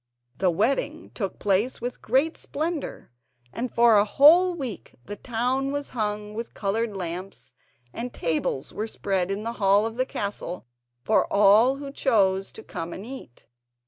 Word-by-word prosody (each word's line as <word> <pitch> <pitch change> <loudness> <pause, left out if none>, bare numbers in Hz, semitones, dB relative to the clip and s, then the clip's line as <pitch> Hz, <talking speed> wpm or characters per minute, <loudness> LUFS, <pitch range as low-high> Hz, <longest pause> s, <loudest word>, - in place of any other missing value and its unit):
The 185 - +3
wedding 245 - -1
took 195 -5 -4
place 205 +5 0
with 245 0 -5
great 270 +8 +2
splendour, 315 - -4 0.4
and 245 +1 -3
for 235 -2 +5
a - - +5
whole 335 - +6
week 265 -9 -6
the 205 - -6
town 255 +4 -1
was 285 0 -3
hung 210 -2 -3
with 230 +2 -6
coloured 210 +1 -1
lamps, 175 -6 -6 0.4
and 240 +1 -5
tables 155 -4 -2
were 215 - -3
spread 190 -4 -1
in 200 +2 -3
the 230 +1 -3
hall 200 +2 +4
of 225 +1 -5
the 255 - +1
castle 200 -5 -5 0.4
for 220 - +2
all 210 +6 +5
who 280 0 -7
chose 195 -9 +1
to 220 - -9
come 165 +1 -6
and 195 - -8
eat. 250 - -10
220 Hz, 160 wpm, -25 LUFS, 195-260 Hz, 0.4 s, whole